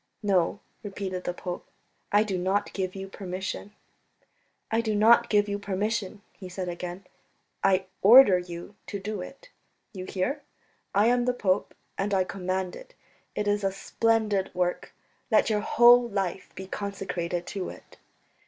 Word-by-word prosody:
"No," 195 Hz, -1 st, +1 dB, 0.2 s
repeated 195 Hz, -3 st, -5 dB
the 175 Hz, -, -1 dB
pope, 180 Hz, -1 st, -5 dB, 0.5 s
"I 205 Hz, +1 st, +5 dB
do 205 Hz, -3 st, -3 dB
not 190 Hz, +3 st, 0 dB
give 185 Hz, -1 st, -3 dB
you 195 Hz, 0 st, -6 dB
permission." 190 Hz, +1 st, -5 dB, 1.0 s
"I 225 Hz, +1 st, +2 dB
do 220 Hz, -2 st, -1 dB
not 230 Hz, +3 st, +5 dB
give 205 Hz, -1 st, +3 dB
you 205 Hz, 0 st, -2 dB
permission," 205 Hz, +1 st, -2 dB
he 185 Hz, -3 st, -10 dB
said 180 Hz, 0 st, -5 dB
again. 175 Hz, +2 st, -6 dB, 0.6 s
"I 190 Hz, 0 st, +3 dB, 0.2 s
order 205 Hz, -3 st, +8 dB
you 175 Hz, +2 st, -8 dB
to 205 Hz, -, -4 dB
do 205 Hz, 0 st, -4 dB
it. -, -, -11 dB, 0.4 s
You 185 Hz, -2 st, -6 dB
hear? 245 Hz, +12 st, -2 dB, 0.5 s
I 205 Hz, +2 st, +5 dB
am 245 Hz, +1 st, +3 dB
the 250 Hz, -, +2 dB
pope, 190 Hz, -4 st, 0 dB, 0.2 s
and 200 Hz, +1 st, 0 dB
I 190 Hz, -, +3 dB
command 185 Hz, 0 st, -3 dB
it. -, -, -13 dB, 0.4 s
It 210 Hz, -, -1 dB
is 205 Hz, 0 st, +1 dB
a 195 Hz, -, +1 dB
splendid 210 Hz, -1 st, 0 dB
work; 180 Hz, 0 st, -1 dB, 0.4 s
let 220 Hz, -1 st, +3 dB
your 210 Hz, -1 st, +1 dB
whole 240 Hz, +2 st, +6 dB
life 195 Hz, -3 st, -3 dB
be 190 Hz, -, -7 dB
consecrated 185 Hz, -3 st, -4 dB
to 195 Hz, -3 st, -4 dB
it." -, -, -13 dB
195 Hz, 155 wpm, -27 LUFS, 185-215 Hz, 1.0 s, order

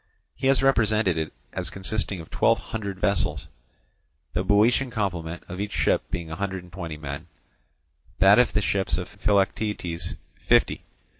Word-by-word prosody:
He 135 Hz, -, -2 dB
has 135 Hz, 0 st, +4 dB
represented 110 Hz, -8 st, +3 dB
it 80 Hz, -, -3 dB, 0.2 s
as -, -, -1 dB
consisting 95 Hz, 0 st, -2 dB
of 80 Hz, -, -14 dB
twelve -, -, +3 dB
hundred 100 Hz, -4 st, -5 dB
vessels; 100 Hz, 0 st, 0 dB, 0.8 s
the 90 Hz, -, 0 dB
Boeotian 110 Hz, +7 st, +3 dB
complement 90 Hz, -7 st, -3 dB
of 90 Hz, +1 st, -7 dB
each 105 Hz, 0 st, -3 dB
ship -, -, +2 dB
being 85 Hz, -2 st, -4 dB
a -, -, -3 dB
hundred 95 Hz, 0 st, -3 dB
and 90 Hz, -2 st, -17 dB
twenty 85 Hz, -4 st, -5 dB
men, 70 Hz, +2 st, -6 dB, 0.9 s
that 100 Hz, +4 st, +7 dB
of 125 Hz, -, +3 dB
the 105 Hz, -, +1 dB
ships 95 Hz, -1 st, 0 dB
of -, -, -4 dB
Philoctetes 95 Hz, -4 st, -1 dB, 0.2 s
fifty. -, -, +2 dB
95 Hz, 155 wpm, -25 LUFS, 85-105 Hz, 0.9 s, that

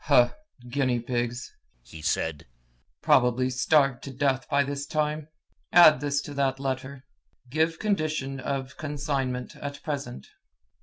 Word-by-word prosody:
"Huh! 125 Hz, -5 st, +5 dB, 0.4 s
guinea 130 Hz, -1 st, +1 dB
pigs!" 120 Hz, +1 st, -3 dB, 0.3 s
he 80 Hz, +6 st, -11 dB
said. 80 Hz, -1 st, -1 dB, 0.6 s
"Probably 125 Hz, 0 st, +3 dB
starved 135 Hz, 0 st, +3 dB
to 135 Hz, -, -6 dB
death 135 Hz, 0 st, 0 dB
by 140 Hz, 0 st, +3 dB
this 140 Hz, +1 st, -4 dB
time! 150 Hz, 0 st, -1 dB, 0.4 s
Add 170 Hz, -3 st, +8 dB
this 140 Hz, 0 st, 0 dB
to 145 Hz, -, -7 dB
that 135 Hz, -1 st, 0 dB
letter: 135 Hz, 0 st, -4 dB, 0.5 s
'Give 160 Hz, +2 st, +1 dB
condition 155 Hz, -9 st, -1 dB
of 130 Hz, 0 st, -4 dB
consignment 140 Hz, -4 st, -3 dB
at 140 Hz, 0 st, -7 dB
present.'" 135 Hz, -, -4 dB
135 Hz, 125 wpm, -27 LUFS, 125-145 Hz, 0.6 s, Add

